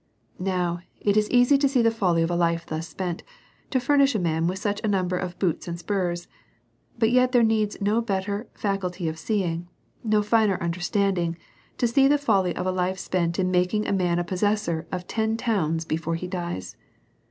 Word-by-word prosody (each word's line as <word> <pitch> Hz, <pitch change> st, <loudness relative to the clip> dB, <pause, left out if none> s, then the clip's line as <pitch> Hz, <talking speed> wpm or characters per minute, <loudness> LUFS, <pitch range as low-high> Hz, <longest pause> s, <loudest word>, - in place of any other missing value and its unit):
Now, 180 Hz, -2 st, -1 dB, 0.2 s
it 205 Hz, -1 st, +1 dB
is 210 Hz, 0 st, +2 dB
easy 250 Hz, +3 st, +5 dB
to 280 Hz, -1 st, +3 dB
see 255 Hz, -3 st, +2 dB
the 230 Hz, -, +4 dB
folly 180 Hz, -7 st, +1 dB
of 165 Hz, -, -1 dB
a -, -, 0 dB
life 170 Hz, -1 st, +1 dB
thus 160 Hz, +1 st, -4 dB
spent 180 Hz, -2 st, -4 dB, 0.5 s
to 260 Hz, -, +1 dB
furnish 275 Hz, 0 st, +3 dB
a -, -, +2 dB
man 165 Hz, -2 st, 0 dB
with 185 Hz, +2 st, -1 dB
such 205 Hz, +1 st, -2 dB
a -, -, 0 dB
number 185 Hz, -3 st, +1 dB
of 180 Hz, -1 st, -4 dB
boots 180 Hz, -4 st, -1 dB
and 170 Hz, 0 st, -4 dB
spurs. 175 Hz, -1 st, -2 dB, 0.7 s
But 225 Hz, 0 st, +2 dB
yet 250 Hz, +1 st, +3 dB
there 245 Hz, -2 st, +5 dB
needs 220 Hz, -2 st, +1 dB
no 210 Hz, +3 st, +2 dB
better 200 Hz, 0 st, -2 dB
faculty 185 Hz, -4 st, -2 dB
of 160 Hz, 0 st, -4 dB
see 205 Hz, +4 st, 0 dB
ing, 170 Hz, 0 st, -3 dB, 0.4 s
no 215 Hz, -2 st, +2 dB
finer 210 Hz, -2 st, +3 dB
understanding, 175 Hz, 0 st, 0 dB, 0.4 s
to 240 Hz, -, +2 dB
see 270 Hz, +4 st, +4 dB
the 290 Hz, +1 st, +4 dB
folly 200 Hz, -10 st, +1 dB
of -, -, -3 dB
a 185 Hz, -, +1 dB
life 185 Hz, +1 st, -1 dB
spent 170 Hz, -2 st, -1 dB
in 185 Hz, -1 st, +1 dB
making 180 Hz, +4 st, +1 dB
a -, -, 0 dB
man 180 Hz, -3 st, +1 dB
a 175 Hz, -, +1 dB
possessor 180 Hz, -2 st, -1 dB
of 180 Hz, -1 st, -4 dB
ten 220 Hz, +2 st, -1 dB
towns 165 Hz, -9 st, 0 dB
be 155 Hz, -, -1 dB
fore 165 Hz, 0 st, -2 dB
he 165 Hz, -, -4 dB
dies. 175 Hz, -, -5 dB
190 Hz, 205 wpm, -25 LUFS, 175-215 Hz, 0.7 s, easy